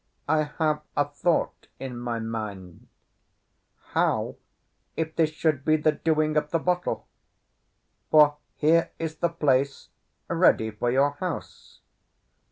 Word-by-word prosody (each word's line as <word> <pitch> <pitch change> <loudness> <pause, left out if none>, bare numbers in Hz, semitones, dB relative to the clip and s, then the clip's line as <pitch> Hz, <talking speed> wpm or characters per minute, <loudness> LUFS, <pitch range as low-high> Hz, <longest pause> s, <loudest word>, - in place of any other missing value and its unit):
I 155 -1 +2
have 155 -1 +1 0.2
a 145 - +4
thought 150 +4 -1
in 130 -2 -6
my 120 -1 -3
mind. 105 -6 -6 1.1
How - - +1 0.6
if 160 0 -2
this 160 -2 +3
should 155 -3 0
be 155 +1 +3
the 155 0 +3
doing 155 0 +1
of 150 0 0
the 165 - +1
bottle? 180 +2 -1 1.0
For 150 -1 +6 0.2
here 165 +2 +3
is 160 -1 -4
the 170 - +1
place 140 -4 0 0.4
ready 110 0 +3
for 115 +3 -2
your 135 +3 +3
house." 180 -2 -6
150 Hz, 125 wpm, -26 LUFS, 130-160 Hz, 1.1 s, For